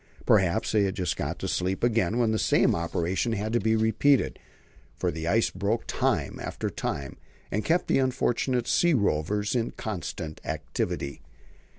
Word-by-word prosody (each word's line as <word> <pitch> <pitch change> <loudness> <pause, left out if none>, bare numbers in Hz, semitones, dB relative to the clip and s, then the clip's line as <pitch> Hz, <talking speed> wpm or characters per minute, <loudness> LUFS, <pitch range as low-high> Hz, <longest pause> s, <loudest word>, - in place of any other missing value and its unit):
Perhaps 105 +2 +3
they 110 - +3
had 95 - -2
just 90 -2 -1
got - - -3
to - - -4
sleep 95 +3 -1
again 115 -3 +2
when 115 -2 +2
the 110 - 0
same - - +3
operation 85 +6 -1
had 110 +1 -2
to 120 - +3
be 110 +1 +2
repeated; 110 +5 +2 0.6
for - - -1
the 80 +1 -5
ice 110 +6 +2
broke 100 +5 -1
time - - -1
after - - -4
time, 70 -1 -4 0.3
and 105 +2 -1
kept 170 +2 +2
the - - +2
unfortunate 130 -1 +1
"sea 175 -3 +3
rovers" 100 0 0
in 120 -2 0
constant 85 -6 -5
activity. 70 -1 -3
110 Hz, 165 wpm, -27 LUFS, 90-115 Hz, 0.6 s, Perhaps